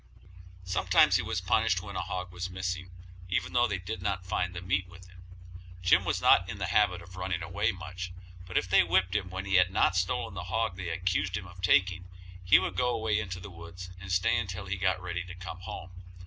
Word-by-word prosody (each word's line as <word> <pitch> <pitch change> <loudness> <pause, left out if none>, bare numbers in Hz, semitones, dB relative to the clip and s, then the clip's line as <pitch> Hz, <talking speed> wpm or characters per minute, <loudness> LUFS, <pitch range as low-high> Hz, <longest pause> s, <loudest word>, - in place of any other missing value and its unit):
Sometimes 90 0 +4
he - - 0
was 90 - -2
punished 95 +1 +2
when 100 -1 -8
a - - -1
hog 90 0 -4
was 90 0 -4
missing, 95 0 -3 0.4
even 90 -1 -1
though 120 0 +4
they 100 - -1
did 95 +2 -5
not 95 -1 -2
find 90 0 -1
the - - -3
meat 95 0 0
with 90 0 -14
him. 90 0 -16 0.6
Jim 90 - +5
was - - 0
not 90 - +5
in 100 - -5
the 95 - -2
habit 95 -5 +3
of 90 +1 -13
running 90 -2 -2
away 95 +1 0
much, 90 0 -7 0.4
but 95 - -2
if 90 - +1
they 95 +1 +6
whipped 90 +2 +2
him 95 -3 0
when 95 +1 -5
he 95 -1 +3
had 90 0 +5
not 95 - +2
stolen 90 0 0
the 90 -2 -5
hog 110 +1 -1
they 90 -2 -5
accused 90 +2 0
him 90 - -6
of 90 0 -12
taking, 90 0 +3 0.4
he 90 +3 +7
would - - -1
go 125 0 +2
away 110 -3 +1
into 95 -4 -4
the 95 +2 -9
woods 85 +2 -10
and 90 0 -7
stay 90 0 +3
until 90 +1 -4
he 95 +1 -2
got 95 -1 +1
ready 85 -1 -4
to 90 0 -10
come 90 0 -8
home. 95 -1 -7
90 Hz, 230 wpm, -29 LUFS, 90-95 Hz, 0.6 s, he